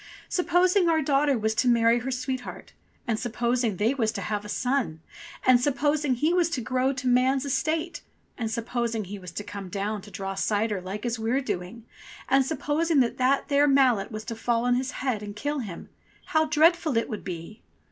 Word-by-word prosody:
"Supposing 360 +1 +3
our 320 -2 +2
daughter 280 -1 +2
was 220 0 0
to 235 +3 +1
marry 235 0 +4
her 250 +3 -4
sweetheart, 255 0 -5 0.3
and 225 -2 -1
supposing 240 -2 0
they 220 +7 +2
was 225 -5 0
to 195 - -4
have 205 +2 -3
a 210 - -9
son, 245 - -1 0.5
and 255 -1 +6
suppos 290 +3 +1
ing 265 -3 +1
he 305 +8 +1
was 350 -2 +3
to 330 - -2
grow 255 +3 0
to 260 -1 -4
man's 260 +2 +3
estate, 315 +5 -1 0.3
and 225 -3 -3
supposing 230 0 -2
he 200 +2 -7
was 180 -1 -9
to 205 - -4
come 200 -2 -7
down 205 +2 -3
to 205 - -13
draw 195 -1 -5
cider 205 0 0
like 195 +5 -6
as 235 -1 -2
we're 230 +4 +1
doing, 220 -2 -5 0.4
and 270 +1 +4
supposing 315 +1 +1
that 255 +3 +1
there 285 0 +3
mallet 260 -8 +3
was 215 0 -6
to 230 - -5
fall 235 +1 0
on 245 - +3
his 255 +2 0 0.2
head 240 -6 0
and 205 -1 -7
kill 290 +7 -2
him, 200 -9 -7 0.4
how 315 0 +2
dreadful 315 -2 +3
it 230 - +1
would 215 -5 -6
be 180 +3 -7
245 Hz, 200 wpm, -26 LUFS, 215-280 Hz, 0.5 s, and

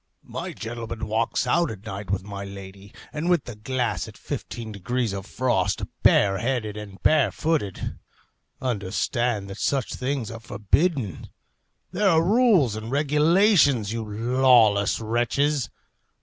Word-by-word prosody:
My - - -5
gentleman 115 -1 -6
walks 110 +2 0
out 170 0 +2
at 105 -1 -9
night 100 -2 -6
with 95 -1 -1
my 100 0 -6
lady, 100 0 -10 0.2
and 155 +3 -2
with 175 -5 +3
the 120 - -7
glass 125 +3 -2
at - - -12
fifteen 115 -2 -6
degrees 110 +3 -2
of 100 +1 -6
frost, 100 -7 0 0.2
bare 95 -1 +4
headed 115 -4 -2
and 105 -2 -9
bare 155 -3 +4
footed. 150 - -2 0.6
Understand 110 -1 -1
that 95 - -8
such 135 -3 0
things 130 -3 -3
are 115 - -7
forbidden. 110 - -1 0.6
There 205 -1 +2
are 165 -2 +4
rules 195 - +4
and 110 +1 -6
regulations, 150 - +3
you 115 -1 -3
lawless 115 -1 +3
wretches. 120 +4 0
115 Hz, 135 wpm, -24 LUFS, 100-140 Hz, 0.6 s, bare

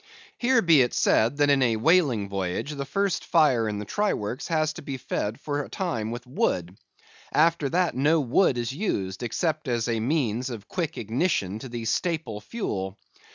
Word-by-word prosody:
Here 245 -1 +3
be 165 -5 +6
it 120 - +1
said 115 +6 +3
that 145 -1 +4
in 140 -1 +3
a 120 -3 +3
whaling 125 - +3
voyage 95 +7 -3
the 140 -2 -4
first 195 +4 0
fire 130 -9 +3
in 105 - -3
the 105 - -5
try 205 - 0
works 105 +6 -4
has 155 -2 +1
to - - -9
be 140 -2 -5
fed 110 -3 -3
for 145 -1 -2
a - - -8
time 115 - -2
with 120 +2 -6
wood. 90 -8 -1 0.6
After 160 -2 +3
that 175 +2 +1
no 150 +5 +3
wood 135 +1 +2
is 120 +1 -2
used, 95 - -2
except 155 +6 -1
as 120 -2 0
a 115 -1 0
means 125 -1 0
of 115 -4 -7
quick 165 -3 -3
ignition 110 - -1
to 130 - -8
the 120 -1 -5
staple 135 - -1
fuel. 100 - -4
130 Hz, 190 wpm, -26 LUFS, 110-160 Hz, 0.6 s, be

